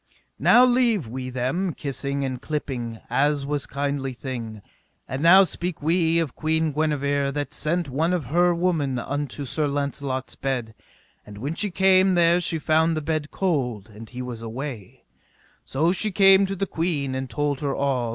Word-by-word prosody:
Now 245 Hz, +1 st, +6 dB
leave 240 Hz, -, +2 dB
we 130 Hz, +2 st, -5 dB
them 135 Hz, +8 st, -2 dB
kissing 140 Hz, 0 st, -3 dB
and 130 Hz, -1 st, -4 dB
clipping, 125 Hz, -7 st, -4 dB
as 145 Hz, 0 st, +1 dB
was 145 Hz, 0 st, -2 dB
kindly 140 Hz, -1 st, -2 dB
thing; 115 Hz, -5 st, -6 dB, 0.4 s
and 130 Hz, +2 st, -4 dB
now 185 Hz, +4 st, +8 dB
speak 175 Hz, -2 st, -4 dB
we 165 Hz, +1 st, +2 dB
of 165 Hz, -6 st, -1 dB
Queen 160 Hz, 0 st, 0 dB
Guenever 140 Hz, -2 st, 0 dB
that 145 Hz, +1 st, -4 dB
sent 170 Hz, +2 st, -1 dB
one 155 Hz, +6 st, 0 dB
of 175 Hz, -6 st, -1 dB
her 175 Hz, +6 st, +3 dB
women 165 Hz, -7 st, 0 dB
unto 145 Hz, +2 st, -4 dB
Sir 150 Hz, +3 st, 0 dB
Launcelot's 140 Hz, -2 st, -3 dB
bed; 125 Hz, -5 st, -3 dB, 0.5 s
and 105 Hz, -1 st, -12 dB
when 140 Hz, +9 st, -3 dB
she 205 Hz, +5 st, -1 dB
came 190 Hz, 0 st, +4 dB
there 170 Hz, 0 st, +4 dB
she 165 Hz, -1 st, 0 dB
found 160 Hz, +1 st, +2 dB
the -, -, -1 dB
bed 155 Hz, -1 st, -2 dB
cold, 125 Hz, -, -2 dB
and 110 Hz, +2 st, -11 dB
he 125 Hz, 0 st, -6 dB
was 120 Hz, -2 st, -6 dB
away; 115 Hz, -2 st, -7 dB, 0.6 s
so 160 Hz, +6 st, +1 dB
she 210 Hz, +3 st, 0 dB
came 195 Hz, 0 st, +6 dB
to 195 Hz, -, -3 dB
the 195 Hz, +1 st, -1 dB
queen 160 Hz, -7 st, -2 dB
and 130 Hz, 0 st, -4 dB
told 145 Hz, +3 st, -1 dB
her 145 Hz, -2 st, -2 dB
all. 130 Hz, -4 st, 0 dB
145 Hz, 170 wpm, -24 LUFS, 130-170 Hz, 0.6 s, now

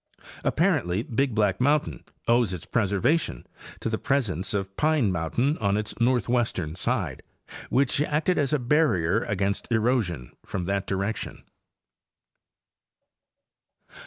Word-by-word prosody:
Apparently 90 Hz, +5 st, +1 dB
Big 130 Hz, -2 st, -1 dB
Black 105 Hz, -1 st, +1 dB
mountain 145 Hz, +3 st, +1 dB, 0.2 s
owes 115 Hz, -4 st, +3 dB
its 90 Hz, -, -6 dB
preservation 105 Hz, -, 0 dB, 0.4 s
to -, -, -2 dB
the 110 Hz, -1 st, -1 dB
presence 100 Hz, -, -1 dB
of 95 Hz, -1 st, -3 dB
Pine 150 Hz, -9 st, +2 dB
mountain 105 Hz, -, 0 dB
on 100 Hz, -1 st, +1 dB
its 105 Hz, 0 st, -3 dB
north 120 Hz, -3 st, +2 dB
western 110 Hz, -10 st, 0 dB
side, 95 Hz, -, -2 dB, 0.5 s
which 140 Hz, +1 st, +2 dB
acted 155 Hz, +4 st, +1 dB
as 145 Hz, -1 st, +1 dB
a 150 Hz, -, +3 dB
barrier 120 Hz, -, +2 dB
against 100 Hz, +2 st, -2 dB
erosion 110 Hz, -, 0 dB
from 90 Hz, -2 st, -4 dB
that 100 Hz, +1 st, -1 dB
direction. 100 Hz, +3 st, -3 dB
110 Hz, 120 wpm, -26 LUFS, 95-130 Hz, 0.5 s, owes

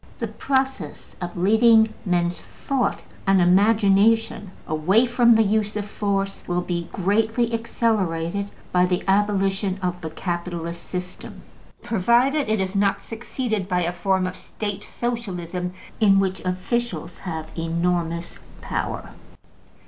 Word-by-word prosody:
The -, -, -3 dB
process 265 Hz, -, -2 dB
of 175 Hz, 0 st, -5 dB
leading 220 Hz, +3 st, +5 dB
men's 175 Hz, -1 st, +1 dB
thought 270 Hz, -3 st, -2 dB, 0.2 s
and 195 Hz, 0 st, +5 dB
imagination 205 Hz, +3 st, +3 dB, 0.2 s
away 180 Hz, +10 st, +3 dB
from 240 Hz, -1 st, +5 dB
the 225 Hz, -, +5 dB
use 210 Hz, 0 st, 0 dB
of 210 Hz, -1 st, -2 dB
force 195 Hz, -1 st, -2 dB
will 175 Hz, 0 st, 0 dB
be 170 Hz, -1 st, -3 dB
greatly 225 Hz, +5 st, +1 dB
accelerated 200 Hz, -5 st, 0 dB, 0.2 s
by 180 Hz, 0 st, +4 dB
the 180 Hz, 0 st, 0 dB
abolition 195 Hz, -1 st, +1 dB
of 180 Hz, 0 st, -2 dB
the 160 Hz, -, -4 dB
capitalist 170 Hz, 0 st, -4 dB
system, 180 Hz, 0 st, -7 dB, 0.4 s
provided 240 Hz, +7 st, +2 dB
it 215 Hz, -1 st, +2 dB
is 190 Hz, +1 st, -2 dB
not 200 Hz, 0 st, +2 dB
succeeded 225 Hz, -3 st, -3 dB
by 180 Hz, -2 st, +1 dB
a 170 Hz, +1 st, -1 dB
form 190 Hz, +1 st, +1 dB
of 185 Hz, 0 st, -4 dB
State 205 Hz, 0 st, -5 dB
Socialism 180 Hz, -7 st, -3 dB, 0.3 s
in 200 Hz, -3 st, +5 dB
which 190 Hz, -1 st, 0 dB
officials 185 Hz, -2 st, -2 dB
have 160 Hz, -3 st, -6 dB
enormous 170 Hz, 0 st, -1 dB, 0.2 s
power. -, -, -4 dB
195 Hz, 125 wpm, -23 LUFS, 180-220 Hz, 0.4 s, leading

